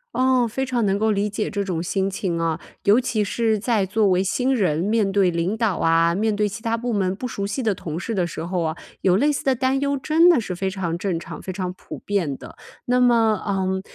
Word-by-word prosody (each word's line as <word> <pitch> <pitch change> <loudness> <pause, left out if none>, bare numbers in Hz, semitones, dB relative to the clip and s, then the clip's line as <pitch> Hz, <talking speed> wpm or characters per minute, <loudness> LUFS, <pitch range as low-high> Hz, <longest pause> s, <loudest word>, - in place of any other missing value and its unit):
哦， 255 -1 +3
非 265 +4 -2
常 245 -4 0
能 195 +1 +1
够 220 0 +2
理 205 +1 0
解 210 +1 -2
这 200 -1 -2
种 175 -4 -2
心 190 +2 -1
情 185 -3 -2
啊。 165 -1 -1 0.2
尤 210 +5 +5
其 245 -4 0
是 220 +1 0
在 215 -2 +1
作 205 +2 +1
为 185 0 +3
新 250 +7 0
人， 180 -11 +1
面 210 +2 +1
对 195 -2 +2
领 170 +5 -1
导 220 -5 0
啊、 165 +1 +3
面 215 +2 0
对 210 0 +1
其 220 +3 -8
它 230 -1 0
部 240 +1 -3
门 190 -3 0
不 250 - -6
熟 200 -2 -3
悉 245 +6 -3
的 215 -3 +2
同 160 -3 -6
事 225 - -4
的 180 -4 0
时 160 - -6
候 175 0 -2
啊， 160 -1 -1 0.3
有 185 -1 +3
类 290 +8 +3
似 285 - -3
的 265 -1 +3
担 260 +2 +1
忧 280 0 0
真 315 +6 +4
的 275 -9 +4
是 185 - -5
非 190 +2 -2
常 180 -3 -3
正 180 -2 -2
常、 - - -9
非 185 - -6
常 185 -1 -3
普 - - -10
遍 175 -10 -2
的。 - - -12 0.3
那 250 +1 +2
么， 230 -4 +3
嗯， 190 -1 0
200 Hz, 265 characters per minute, -22 LUFS, 185-230 Hz, 0.3 s, 尤